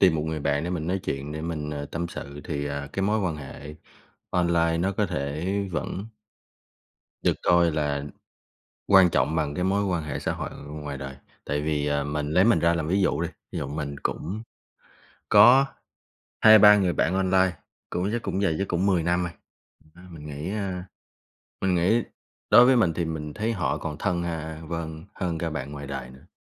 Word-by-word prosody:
tìm 90 -4 +5
một 75 - -1
người 80 0 -3
bạn 70 +2 0
để 90 - -3
mình 80 -3 -3
nói 95 +2 0
chuyện, 70 +2 -3
để 80 - -5
mình, 80 -2 -3
ờ, 70 -1 -4
tâm 85 +3 -4
sự 70 -3 -8
thì, 70 -4 -3
à, 70 0 -4
cái 95 - -2
mối 105 +2 +1
quan 90 -5 -1
hệ 75 +1 -9 0.6
online 85 -2 +2
nó 95 +3 0
có 105 +1 0
thể 75 +6 -2 0.2
vẫn 95 +4 -3 1.2
được - - +2
coi 85 -1 +4
là 75 -2 -1 0.8
quan 95 -3 +7
trọng 70 +1 +1
bằng 75 -3 0
cái 90 - -1
mối 100 +2 +1
quan 90 -4 -1
hệ 75 -3 -4
xã - - -1
hội - - -5
ngoài 75 -1 -7
đời. 65 0 -7 0.3
Tại 75 0 -1
vì, 75 -1 -1
ờ, 70 -1 0
mình 75 +1 -2
lấy 90 +4 +5
mình 115 - +4
ra 85 0 +3
làm 80 -2 -2
ví 95 +4 +2
dụ 80 -4 +1
đi, 85 - 0 0.2
ví - - -3
dụ - - -3
mình 70 0 -4
cũng 100 +8 -3 0.9
có 120 +7 +8 0.8
2-3 105 -1 +9
người 95 -3 +1
bạn 80 - +1
online, 95 -1 +3 0.4
cũng 90 +3 -1
chắc 120 - -1
cũng 95 -1 -2
dày, 95 -6 +1
chắc 100 - -1
cũng 90 +2 0
10 90 -4 +2
năm 90 +1 +1
rồi. 85 - -3 0.5
Thật 80 - -24
ra 90 - -15
mình 80 -4 -10
nghĩ, 75 +3 -5
a, 95 -4 -3 0.8
mình 95 -1 +2
nghĩ 95 +7 +3 0.5
đối 125 - +9
với 130 0 +5
mình 90 -8 +3
thì 85 - -1
mình 75 -2 -5
thấy 110 +2 -1
họ 90 -7 -1
còn 75 - -5
thân, 85 +1 0
a, 80 -2 -4
vâng, 80 0 -5
hơn 85 -3 -2
cả 85 0 -2
bạn 70 -2 -5
ngoài 70 -1 -7
đời 65 -2 -6
nữa. 65 +5 -16
85 Hz, 205 wpm, -26 LUFS, 75-95 Hz, 1.2 s, 2-3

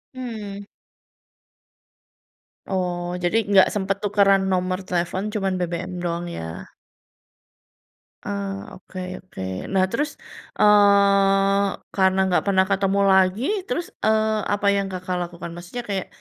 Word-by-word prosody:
Mmm. 215 -6 -6 2.0
Oh, 180 -2 -2
jadi 175 +5 +2
nggak 195 -2 +7
sempat 195 -1 -1
tukeran 200 -1 +4
nomor 185 0 0
telepon, 180 +4 -2
cuman 195 -3 -1
BBM 175 0 -3
doang, 170 0 -2
ya. 80 - -7 1.6
Eee, 200 -1 -3 0.2
oke 185 0 -10 0.2
oke. 185 - -10 0.3
Nah, 190 -1 +4
terus, 295 +6 0 0.5
eee, 200 -1 +5 0.3
karena 190 -1 +3
nggak 180 - +2
pernah 190 -1 +4
ketemu 195 0 +1
lagi, 190 +3 +3 0.2
terus, 345 - -2 0.2
eee, 220 0 +3 0.2
apa 205 0 0
yang 200 -1 0
Kakak 185 0 -4
lakukan? 170 0 -8
Maksudnya 175 +8 -7
kayak 195 -2 -2
195 Hz, 115 wpm, -23 LUFS, 185-200 Hz, 2.0 s, nggak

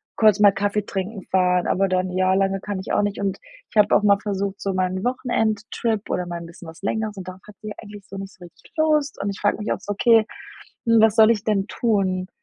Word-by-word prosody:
kurz 215 -2 +4
mal 205 -1 +7
Kaffee 205 +1 -1
trinken 195 +2 -4
fahren, 180 -1 +2
aber 195 +1 +2
dann 185 0 0
ja 185 +1 +2
lange 195 0 +1
kann 205 -2 -4
ich 190 - -5
auch - - +3
nicht.“ 205 -1 -2
Und 195 -1 -2 0.3
ich - - -20
habe 210 - +5
auch - - +3
mal 200 -1 +5
versucht, 200 -1 -3
so 195 -1 -2
mal 185 0 +1
'n 185 +1 -4
Wochenendtrip 225 -3 -1
oder 180 - -1
mal 175 -1 -5
'n - - -8
bisschen 170 0 -13
was 165 +2 -13
längeres 215 0 -2
und 185 - -8
darauf 185 +1 -9
hat 210 - -13
sie 215 -1 -6
eigentlich 205 -2 -12
so 195 - -9
nicht 195 0 -7
so 180 - -16
richtig 170 - -19
Lust. 305 -2 +1
Und 200 - -2
ich 195 - -9
frage 205 - +2
mich 210 - -3
auch - - -6
so: 205 - -5
„Okay, 225 +1 +4 0.6
hm, 230 -1 +5
was 220 -1 +4
soll 220 0 +7
ich 210 -3 +1
denn 200 -3 0
tun?“ 190 -5 0
200 Hz, 250 wpm, -22 LUFS, 190-215 Hz, 0.6 s, mal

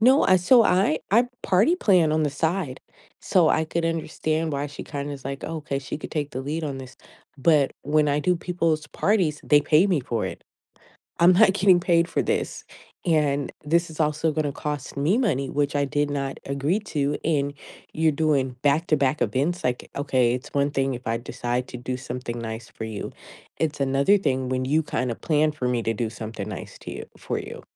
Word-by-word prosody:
No, 260 +5 +5
I 185 - +6
so, 225 +6 +5
I 180 -3 +3
I 235 +4 +4 0.2
party 210 - +3
plan 180 - +4
on 155 0 +2
the 145 - 0
side, 160 -2 -2 0.4
so, 175 -4 +3
I 160 - +2
could 165 +1 -2
understand 160 -1 -1
why 140 +1 -1
she 145 - -8
kinda 145 -1 -5
is 135 -2 -9
like, 135 +1 -5
"Okay, 150 -3 -3
she 135 +2 -6
could - - -8
take 145 -3 -2
the 130 - -4
lead 155 +4 -3
on 140 -2 -4
this," 130 -1 -10 0.4
but 145 -1 +3
when 150 +1 +2
I 145 +1 +1
do 180 +3 +2
people's 165 -3 -1
parties, 180 -8 +1
they 145 -1 +5
pay 155 +6 +4
me 175 -7 +1
for 115 -4 -2
it. 90 - -7 0.8
I'm 175 +2 +7
not 195 +1 +6
getting 190 -2 +5
paid 170 -2 +2
for - - 0
this, - - -2 0.4
and 145 -4 +1
this 170 +3 +2
is 160 0 -9
also 155 +1 +1
gonna 150 -2 -1
cost 150 -2 -5
me 150 +10 +2
money, 140 - 0
which 145 0 0
I 145 - +2
did 145 +1 0
not 140 -1 -3
agree 140 +9 0
to, 145 -7 -1
and 145 -3 0 0.4
you're 160 0 +3
doing 140 -3 +1
back-to-back 145 -1 +2
events, 140 +11 0
like, 125 -1 -1
okay, 130 -4 +2
it's 130 +4 -6
one 140 0 +2
thing 135 -1 0
if 125 0 -9
I 115 +1 0
decide 120 +1 -3
to 125 - -7
do 125 +1 -4
something 125 -2 -5
nice 110 0 -6
for - - -10
you, 110 -2 -5 0.5
it's 155 -2 -1
another 140 +9 +3
thing 130 -8 -1
when 130 0 0
you 155 +4 +2
kinda 125 -5 -2
plan 155 +3 +1
for 130 -4 -2
me 125 -1 0
to 115 - 0
do 110 0 -2
something 110 -2 -6
nice - - -7
to - - -8
you - - -6
for - - -3
you. - - -8
145 Hz, 205 wpm, -24 LUFS, 135-165 Hz, 0.8 s, I'm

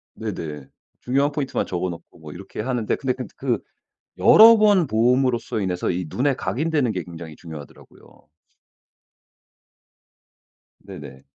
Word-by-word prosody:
네네. 75 -4 -6 0.3
중요한 140 +3 +1
포인트만 145 -3 -2
적어 90 0 -2
놓고 85 0 -12
뭐 75 -2 -11
이렇게 95 +3 -8
하는데 120 -2 -1
근데 130 -2 -1
근데 130 -1 -8
그 130 -3 -1 0.6
여러 225 +1 +8
번 205 -6 +4
봄으로써 120 0 +1
인해서 90 -2 -2
이 90 -1 -2
눈에 135 - 0
각인되는 145 -3 -1
게 90 -3 -3
굉장히 80 -2 -10
중요하더라고요. 80 -5 -13 2.5
네네. 75 -9 -11
110 Hz, 290 characters per minute, -22 LUFS, 85-135 Hz, 2.5 s, 여러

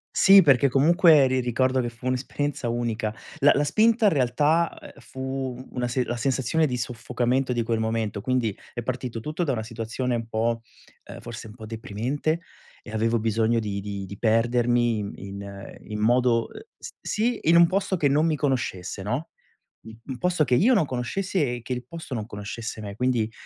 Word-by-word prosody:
Sì, 195 0 +8
perché 140 -3 +5
comunque 155 +1 +5
ri 130 0 +1
ricordo 130 +2 +1
che 120 -1 -1
fu 120 +2 -8
un'esperienza 130 0 -2
unica. 115 -2 -2 0.3
La 145 - +6
la 145 - +1
spinta 220 +8 +3
in 200 - +6
realtà, 145 +6 +2
ehm, - - -12
fu 130 -1 -5
una 125 -1 -2 0.2
la 120 - -3
sensazione 135 +5 +1
di 125 - -1
soffocamento 125 +1 -1
di 120 - 0
quel 115 -1 -1
momento, 110 -2 -2
quindi 125 -5 0 0.2
è 120 - -4
partito 125 -1 -4
tutto 155 +8 -3
da 145 - 0
una 110 -3 -2
situazione 115 +2 -3
un 115 -1 -4
po', 115 +1 -1 0.4
ehm, - - -10
forse 115 -1 -8
un 105 - -12
po' 110 -2 -10
deprimente 130 +8 -2 0.4
e 110 - -10
avevo 115 +1 +1
bisogno 115 +1 +1
di 100 -2 -3
di 100 -1 -5
di 100 +1 -9
perdermi 120 0 +2
in 100 -1 -4
in 100 0 -8
in 105 -1 -6
modo 120 +1 +3 0.5
sì 230 +2 -1
in 165 +2 +4
un 170 - +7
posto 190 +1 0
che 150 -4 +2
non 150 +3 +3
mi 160 -2 +2
conoscesse, 120 - -2
no, 125 +11 -3 0.5
un 110 0 -12
un 130 -2 -6
posto 180 0 +1
che 125 - +2
io 240 - +4
non 190 -9 +3
conoscessi 150 +9 -2
e 120 -3 -1
che 125 +3 -4
il 125 0 -5
posto 165 -5 -8
non 110 -3 -3
conoscesse 110 +1 -6
me. 100 -1 -7
Quindi, 120 -3 0
125 Hz, 185 wpm, -25 LUFS, 115-145 Hz, 0.5 s, Sì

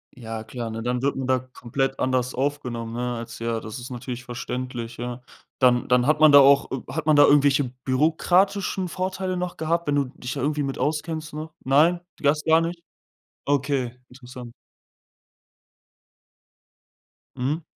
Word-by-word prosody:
Ja, 115 -2 -6
klar, 120 0 -6
ne? 110 0 -5
Dann 125 +1 -1
wird 140 +1 0
man 135 - -3
da 130 -1 +3
komplett 130 +1 -3
anders 130 -1 0
aufgenommen, 125 -4 -3
ne? 120 0 -2
Als 115 0 -7
ja 115 -1 -1
das 110 +3 -7
ist 125 +2 -8
natürlich 125 0 -6
verständlich, 120 -1 -5
ja. 120 +1 -5 0.4
Dann 125 -2 +3
dann 125 0 +3
hat 150 +2 +2
man 155 -1 +7
da 145 - +10
auch 140 0 +5
äh, 130 - -4
hat 160 -1 -3
man 155 - +5
da 145 - +8
irgendwelche 145 -1 +4 0.2
bürokratischen 180 +7 +1
Vorteile 185 +1 -3
noch 180 0 -4
gehabt, 165 +1 -1
wenn 145 - +1
du 140 - +2
dich 130 -1 -7
da - - -4
irgendwie 150 +2 0
mit 135 -1 -3
auskennst, 155 0 -2
ne? 155 +1 -6
Nein? 155 +6 +4 0.2
Das 150 +1 +1
gar 160 +1 +4
nicht? 170 +1 -4 0.6
Okay, 140 -3 -1
interessant. 125 -1 -11 2.8
Mhm. 140 +6 -2
135 Hz, 160 wpm, -24 LUFS, 125-155 Hz, 2.8 s, da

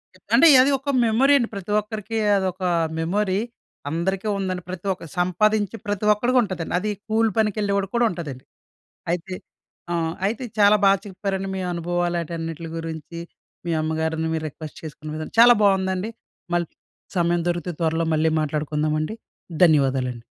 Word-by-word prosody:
ఎ - - -20 0.2
అంటే, 290 +8 +7
అది 270 +2 +3
ఒక 280 +2 -2
మెమొరీ 245 +6 +4
అండి. 240 -4 -1
ప్రతి 200 +1 -6
ఒక్కరికి 215 +1 -5 0.2
అదొక 185 -1 -2 0.4
మెమొరీ. 190 +3 0 0.5
అందరికీ 190 +5 -1
ఉందండి. 185 -2 -3
ప్రతి 185 0 -7
ఒక్కరు 165 -4 -12
సంపాదించే 205 +4 +1
ప్రతి 205 0 -2
ఒక్కడికుంటదండి. 210 -7 0
అది 210 +3 -2 0.2
కూలి 220 0 +2
పనికెళ్ళే 210 -2 +1
వాడికి 195 -1 -3
కూడా 235 0 +4
ఉంటదండి. 150 -7 -7 0.7
అయితే 180 +2 -3 0.6
ఆహ్, 165 -1 -1
అయితే 225 +5 -1 0.2
చాలా 205 +1 +6
బా - - +7 0.2
చెప్పారండి 195 0 -3
మీ - - -3
అనుభవాలు 175 0 -1
ఆటన్నిటిలి 165 0 -5
గురించి, 165 0 -6 0.5
మీ 170 - -1
అమ్మగారిని 160 +1 -1
మీరు 160 -1 -2
రిక్వెస్ట్ 155 +1 -10
చేసుకున్న 155 0 -7
విధానం, 155 0 -6
చాలా 240 +1 +9
బావుందండి. 190 +1 +1 0.4
మళ్ళీ 175 -1 0 0.5
సమయం 175 0 +2
దొరికితే 175 0 -2
త్వరలో 165 0 +1
మళ్ళీ 160 +1 +2
మాట్లాడుకుందామండి. 155 +3 -1 0.5
ధన్యవాదాలండి. 135 -6 +1
180 Hz, 140 wpm, -23 LUFS, 160-205 Hz, 0.7 s, చాలా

